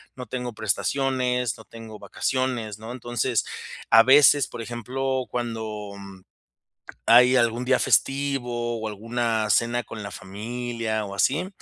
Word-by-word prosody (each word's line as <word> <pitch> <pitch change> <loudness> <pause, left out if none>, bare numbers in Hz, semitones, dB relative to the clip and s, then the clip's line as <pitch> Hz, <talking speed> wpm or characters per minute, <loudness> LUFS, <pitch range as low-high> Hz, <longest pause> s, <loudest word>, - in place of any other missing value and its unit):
no 125 - -7
tengo 125 -2 -5
prestaciones, 125 +2 0
no - - -14
tengo 110 -2 -11
vacaciones, 125 -5 -2
¿no? 110 +2 -8
Entonces, 120 -1 -1 0.4
a 115 0 +8
veces, 140 +1 +6
por 120 - -8
ejemplo, 130 +3 -3
cuando, 110 -4 -4
mm, 95 -1 -11 0.9
hay 125 +2 +7
algún 120 0 +1
día 130 0 +3
festivo 120 -4 0
o 110 - -3
alguna 115 +1 -1
cena 120 +4 +2
con 110 -2 -9
la 100 - -6
familia 110 +3 -4
o 100 - -7
así, 145 - +1
120 Hz, 135 wpm, -24 LUFS, 110-125 Hz, 0.9 s, a